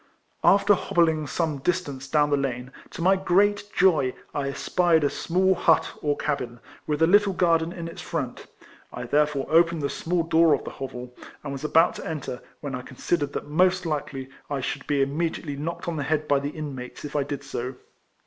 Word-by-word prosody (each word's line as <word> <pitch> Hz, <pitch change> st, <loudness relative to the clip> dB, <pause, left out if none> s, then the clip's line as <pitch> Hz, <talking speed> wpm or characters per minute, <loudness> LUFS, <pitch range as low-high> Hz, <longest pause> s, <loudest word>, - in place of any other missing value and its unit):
221 -, -, +7 dB
After 205 Hz, +1 st, +4 dB
hobbling 160 Hz, -3 st, +2 dB
some 160 Hz, -3 st, -1 dB
distance 145 Hz, -5 st, -2 dB
down 145 Hz, +1 st, +2 dB
the -, -, +5 dB
lane, 130 Hz, -2 st, -3 dB, 0.2 s
to 165 Hz, -, -6 dB
my 190 Hz, +2 st, +5 dB
great 200 Hz, +2 st, +2 dB
joy 160 Hz, -9 st, +3 dB, 0.2 s
I 140 Hz, -1 st, -1 dB
espied 165 Hz, +3 st, +2 dB
a 145 Hz, -, +2 dB
small 190 Hz, +2 st, +2 dB
hut 165 Hz, -3 st, +3 dB
or 145 Hz, -1 st, 0 dB
cabin, 125 Hz, -5 st, -3 dB, 0.3 s
with 150 Hz, +1 st, +1 dB
a -, -, +8 dB
little 200 Hz, +3 st, +4 dB
garden 165 Hz, -2 st, +2 dB
in 170 Hz, -2 st, -6 dB
its 165 Hz, -, -8 dB
front; -, -, -4 dB, 0.4 s
I -, -, -6 dB
therefore 145 Hz, +2 st, +1 dB
opened 165 Hz, -1 st, +3 dB
the 140 Hz, -, 0 dB
small 170 Hz, 0 st, -1 dB
door 165 Hz, -2 st, +4 dB
of -, -, -7 dB
the -, -, -6 dB
hovel, 125 Hz, -2 st, -7 dB, 0.3 s
and 145 Hz, -, -5 dB
was 140 Hz, 0 st, -6 dB
about 160 Hz, +2 st, +4 dB
to -, -, -7 dB
enter, 140 Hz, -5 st, -5 dB, 0.2 s
when 145 Hz, -2 st, -5 dB
I 125 Hz, -, -3 dB
considered 145 Hz, +3 st, -2 dB
that -, -, -4 dB
most 180 Hz, +4 st, +2 dB
likely 140 Hz, -4 st, -3 dB, 0.2 s
I 140 Hz, -1 st, -1 dB
should 130 Hz, -, -4 dB
be 140 Hz, -2 st, +2 dB
immediately 150 Hz, +1 st, -2 dB
knocked 170 Hz, +5 st, -5 dB
on 170 Hz, -2 st, -2 dB
the 145 Hz, -, -1 dB
head 155 Hz, +1 st, 0 dB
by 145 Hz, -1 st, +3 dB
the 140 Hz, +1 st, -3 dB
inmates 145 Hz, -4 st, -7 dB
if 150 Hz, -, -7 dB
1 145 Hz, -2 st, 0 dB
did 145 Hz, -1 st, -4 dB
so. 130 Hz, -1 st, -4 dB
150 Hz, 200 wpm, -25 LUFS, 140-170 Hz, 0.4 s, a